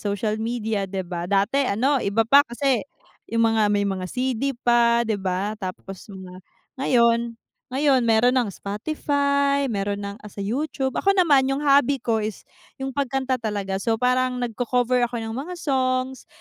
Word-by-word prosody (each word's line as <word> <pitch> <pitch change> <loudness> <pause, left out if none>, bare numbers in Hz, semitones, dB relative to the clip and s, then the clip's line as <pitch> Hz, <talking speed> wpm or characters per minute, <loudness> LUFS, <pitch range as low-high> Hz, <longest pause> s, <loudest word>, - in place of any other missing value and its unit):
social 210 +1 -2
media 220 -3 -2
di 190 0 -4
ba, 175 0 -5
dati 200 +7 +2
ano 260 +7 +1
iba 215 +2 +1
pa 275 +6 +7
kasi 265 -2 0 0.5
yung 230 0 +2
mga 215 -2 +2
may 205 0 +1
mga 190 -2 -3
CD 260 +3 -2
pa, 235 -1 +3
di 215 -3 -2
ba 190 +2 -1
tapos 190 +1 -7
mga 185 -2 -10 0.4
ngayon 235 -3 +2 0.3
ngayon 270 -1 +2
meron 230 +2 +3
ng 245 -5 +1
Spotify, 280 - 0
meron 200 -1 -2
ng 200 +1 -6
sa 200 -1 -7
YouTube. 265 +4 -2
Ako 395 0 +3
naman 295 -8 +4
yung 270 +2 -1
hobby 280 -2 +3
ko 230 -3 +1
is 215 -1 -4 0.4
yung 270 - -2
pagkanta 265 -1 -1
talaga 205 -4 -3
so 225 +3 0
parang 250 +1 +1
nagko-cover 245 +1 +1
ako 235 -1 -5
ng 225 - -5
mga 275 +10 -5
songs, 260 -4 -1
235 Hz, 160 wpm, -23 LUFS, 205-265 Hz, 0.5 s, pa